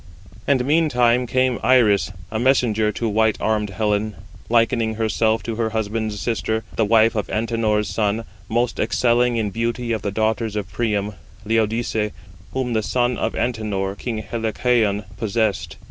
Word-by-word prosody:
And 130 -3 +2
meantime 125 -5 +3
came 130 0 +1
Iris 110 -6 +4 0.2
a 110 - -2
messenger 115 -4 +2
to 115 - -2
white 110 0 +2
armed 105 -1 0
Helen, 105 +1 -1 0.3
likening 115 -1 +2
herself 110 0 +1
to 115 -2 -4
her 115 -1 0
husband's 110 -1 -2
sister, 110 +1 -1
the 110 - +2
wife 110 +1 +4
of 105 -3 -2
Antenor's 110 -2 0
son, 110 +1 0 0.3
most 120 +1 0
excelling 120 0 +2
in 105 -3 -1
beauty 115 +2 -2
of 110 -3 -1
the 100 - -2
daughters 110 +1 -1
of 100 -3 -4
Priam, 105 -1 -1 0.3
Laodice, 110 0 0 0.4
whom 130 -2 -2
the 110 - +1
son 120 +3 0
of - - -2
Antenor, 105 -5 -2
king 110 0 -4
Helicaon, 110 -2 0
possessed. 110 -1 -1
110 Hz, 145 wpm, -21 LUFS, 105-120 Hz, 0.4 s, Iris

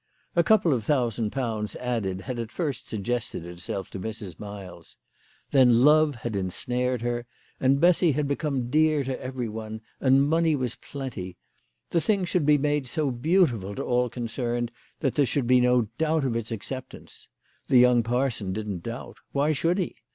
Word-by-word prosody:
A 170 - +5
couple 190 -6 +4
of 120 -4 -1
thousand 115 -4 0
pounds 115 -5 -2
added 110 -7 -2
had 125 +2 -5
at 115 -2 -5
first 145 -2 -3
suggested 110 -4 -2
itself 85 +2 -5
to 95 - -6
Mrs. 105 -4 -6
Miles. 95 -5 -9 0.5
Then 125 -3 +5
love 150 0 +5
had 115 -3 -2
ensnared 125 +6 -1
her, 120 0 -2 0.3
and 135 +1 +3
Bessy 175 -1 +4
had 145 +1 0
become 140 -4 -2
dear 155 -1 +3
to 130 0 -4
every 130 -2 -3
one, 110 0 -6 0.2
and 135 +1 +4
money 165 0 +3
was 125 -4 -2
plenty. 110 -10 -7 0.5
The 170 - +2
thing 200 -2 +1
should 170 -4 0
be 150 -1 +6
made 145 -1 0
so 150 +1 0
beautiful 120 - +1
to - - -3
all 125 0 +1
concerned 120 0 -3 0.3
that 135 -4 +1
there 145 - +3
should 130 +2 0
be 125 +1 +5
no 125 -1 +4 0.2
doubt 160 -2 +1
of 120 -3 -1
its 115 -1 -3
acceptance. 130 +4 -6 0.4
The 130 - +5
young 125 -1 +6
parson 115 -4 -1
didn't 105 -4 -4
doubt. 115 +6 -7 0.2
"Why 145 +2 +2
should 165 +4 +1
he? 185 - -1
125 Hz, 175 wpm, -26 LUFS, 110-145 Hz, 0.5 s, be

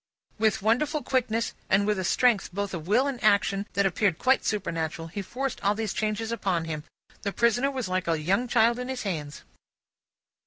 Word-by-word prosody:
With 215 -3 +2
wonderful 285 +8 +1
quickness, 230 -3 0 0.2
and 195 +2 +3
with 210 -2 +1
a - - -1
strength 230 +2 +2
both 200 +1 -3
of 165 -2 -5
will 235 +7 +3
and 275 -4 -3
action, 200 -1 +3
that 200 +1 +2
appeared 195 -2 +1
quite 265 +1 +3
supernatural, 165 -5 -2
he 200 +4 -4
forced 260 +7 -4
all 200 +1 +2
these 220 -2 -2
changes 220 +1 -2
upon 190 -7 -1
him. 155 -1 -5 0.4
The 200 - -2
prisoner 235 +5 +2
was 260 -6 -3
like 185 -1 -1
a 165 -2 +1
young 195 +10 +1
child 235 0 +3
in 250 - -4
his 260 -1 -3
hands. 150 -8 -4
210 Hz, 190 wpm, -27 LUFS, 185-235 Hz, 0.4 s, and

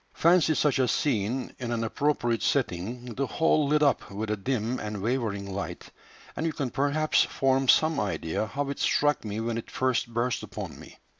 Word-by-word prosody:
Fancy 170 -2 +4
such 145 -2 +2
a 130 - +3
scene 125 -1 -1
in 120 -2 -3
an 115 -1 -1
appropriate 120 -1 0
setting, 120 0 -1
the 135 +4 -1
whole 155 -1 +2
lit 150 +1 +3
up 140 -5 +2
with 105 +2 -4
a - - +1
dim 120 +2 -2
and 105 -1 -4
wavering 100 -3 -2
light, 100 - -6 0.4
and - - -3
you 165 -1 0
can 135 -5 -3
perhaps 145 +3 +2
form 135 0 +1
some 155 +4 +4
idea 100 0 -2
how 140 +5 -3
it 140 - -6
struck 145 0 +2
me 105 0 -4
when 115 0 -2
it - - -10
first 130 -2 0
burst 120 +2 0
upon - - -7
me." - - -13
125 Hz, 190 wpm, -27 LUFS, 110-145 Hz, 0.4 s, Fancy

